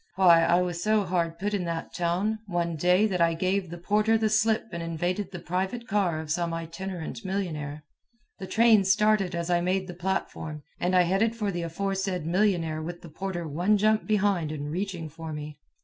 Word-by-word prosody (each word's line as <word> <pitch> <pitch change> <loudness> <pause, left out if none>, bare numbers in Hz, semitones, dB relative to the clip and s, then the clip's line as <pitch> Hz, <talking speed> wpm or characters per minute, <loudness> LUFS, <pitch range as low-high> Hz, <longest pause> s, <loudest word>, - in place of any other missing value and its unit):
Why, 170 -3 +6
I 175 +2 +3
was 175 -1 -3
so 215 0 +2
hard 170 -2 -1
put 205 +4 -2
in 200 -3 0
that 165 -1 -4
town, 185 +6 0
one 170 -2 -1
day, 180 +6 +3
that 185 -5 0
I 165 -1 +3
gave 185 +1 0
the 175 - -7
porter 210 +5 +2
the 220 -1 +1
slip 220 +1 +3
and 170 -1 -4
invaded 175 +4 -2
the 185 - -6
private 190 +8 -3
car 190 -6 +1
of 155 -1 -5
some 170 0 0
itinerant 170 +4 -6
millionnaire. 155 -7 -3 0.6
The 190 - -6
train 225 -2 +5
started 195 -1 +2
as 170 +1 -2
I 175 0 +3
made 185 +2 0
the 180 - -7
platform, 170 -4 -3 0.2
and 180 +1 +1
I 180 - +6
headed 195 +6 +1
for 210 -3 -1
the 175 -1 -3
aforesaid 190 +1 -2
millionnaire 170 -3 +1
with 170 +2 -7
the 170 - -10
porter 175 +1 -4
one 175 +8 +2
jump 215 +1 +2
behind 200 -7 +1
and 150 -1 -4
reaching 180 -2 -3
for 160 +1 -8
me. 150 0 -7
180 Hz, 195 wpm, -27 LUFS, 165-200 Hz, 0.6 s, Why